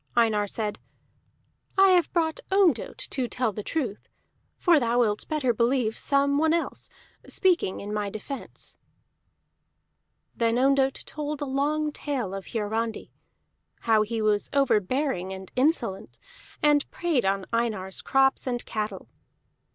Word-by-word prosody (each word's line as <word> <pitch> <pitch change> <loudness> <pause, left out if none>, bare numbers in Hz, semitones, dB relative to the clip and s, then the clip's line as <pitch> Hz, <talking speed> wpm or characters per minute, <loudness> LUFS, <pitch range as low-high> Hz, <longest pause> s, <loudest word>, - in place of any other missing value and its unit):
Einar 215 -3 +3
said: 210 0 -3 1.0
"I 390 0 +7
have 360 -2 +4
brought 320 -2 0
Ondott 370 - +2
to 255 -3 0
tell 250 -2 -1
the 210 - -5
truth, 235 -4 -3 0.5
for 340 -4 +4
thou 240 -1 0
wilt 210 -3 0
better 290 -6 +1
believe 235 -1 +1
some 280 0 +2
one 320 +1 +3
else, 335 - -3 0.4
speaking 355 - +1
in 205 +1 -5
my 210 -1 -1
defence." 220 +7 -7 1.6
Then 230 0 +1
Ondott 270 +1 +2
told 300 -1 -4
a 290 - -2
long 295 +3 0
tale 265 -10 -3
of 195 -1 -6
Hiarandi, 225 +1 -3 0.7
how 220 -2 +3
he 220 +1 -2
was 210 -1 +1
overbearing 255 -5 +1
and 190 -1 -9
insolent, 255 - 0 0.5
and 295 -1 +3
preyed 330 -8 0
on 195 0 0
Einar's 215 -5 -1
crops 270 0 +2
and 245 -1 -2
cattle. 210 -3 -4
245 Hz, 130 wpm, -26 LUFS, 215-290 Hz, 1.6 s, I